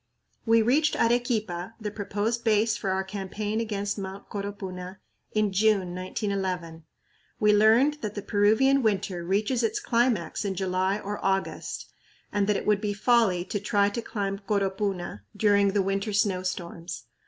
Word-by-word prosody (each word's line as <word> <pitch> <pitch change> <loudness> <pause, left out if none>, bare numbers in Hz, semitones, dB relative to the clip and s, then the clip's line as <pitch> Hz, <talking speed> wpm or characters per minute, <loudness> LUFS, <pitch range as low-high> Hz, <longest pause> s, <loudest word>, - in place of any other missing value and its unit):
We 225 0 +5
reached 295 +7 +3
Arequipa, 225 -5 0
the 210 -2 -4
proposed 210 +3 -2
base 220 0 +3
for 195 - -3
our 190 0 0
campaign 205 +3 -3
against 205 -2 -2
Mt. 195 0 -7
Coropuna, 190 -2 -6 0.4
in 215 -2 +2
June, 195 -2 +2
1911. 185 -3 -3 0.5
We 210 0 +5
learned 230 +8 +4
that 210 -1 -4
the 205 - -4
Peruvian 220 +7 +3
"winter" 195 -5 0
reaches 210 +7 +1
its 225 - 0
climax 235 -7 +1
in 195 -2 -2
July 190 +1 0
or 205 0 -5
August, 195 0 -2 0.4
and 205 -1 +1
that 210 -1 +2
it - - -5
would 210 -1 +2
be 210 -1 -1
folly 205 -5 +3
to 205 - -3
try 205 0 +2
to 235 +3 -4
climb 200 -3 -3
Coropuna 195 - -2 0.2
during 205 -2 +4
the 200 0 +2
winter 195 +2 -1
snowstorms. 185 -4 -2
205 Hz, 150 wpm, -27 LUFS, 190-220 Hz, 0.5 s, We